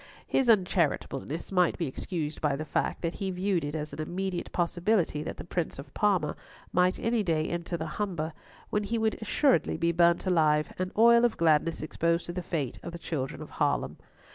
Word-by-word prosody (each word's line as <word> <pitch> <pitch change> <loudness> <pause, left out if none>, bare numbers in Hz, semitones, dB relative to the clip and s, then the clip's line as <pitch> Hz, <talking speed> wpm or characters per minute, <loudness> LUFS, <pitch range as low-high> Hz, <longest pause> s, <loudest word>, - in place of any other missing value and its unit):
His 265 -3 +1
uncharitableness 170 - +1
might 180 -2 +3
be 170 - -1
excused 155 +2 -4
by 150 -2 +2
the 155 +3 -4
fact - - -1
that 170 0 -1
he 195 - -3
viewed 185 -2 0
it 145 +2 -3
as 150 -1 -4
an 150 - -4
immediate 180 +2 -3
possibility 175 -2 +1
that 155 - -5
the - - -6
Prince 175 -1 -3
of 135 0 -10
Parma 195 -7 +1 0.4
might 180 +1 +3
any 230 0 +1
day 160 -5 0
enter 170 0 -3
the 160 - -4
Humber, 165 -2 -3 0.4
when 210 0 0
he 230 +3 -1
would 220 0 0
assuredly 260 - +2
be 170 +1 +2
burnt 170 +1 +3
alive, 155 -5 +2
and 185 0 -1
Oil 235 +1 +7
of 240 -2 +2
Gladness 160 0 +2
exposed 170 +2 0
to 175 - -5
the 180 - -3
fate 150 -7 -3
of 170 - -7
the - - -5
children 145 -5 -4
of - - -12
Haarlem. - - +1
170 Hz, 195 wpm, -29 LUFS, 155-190 Hz, 0.4 s, Oil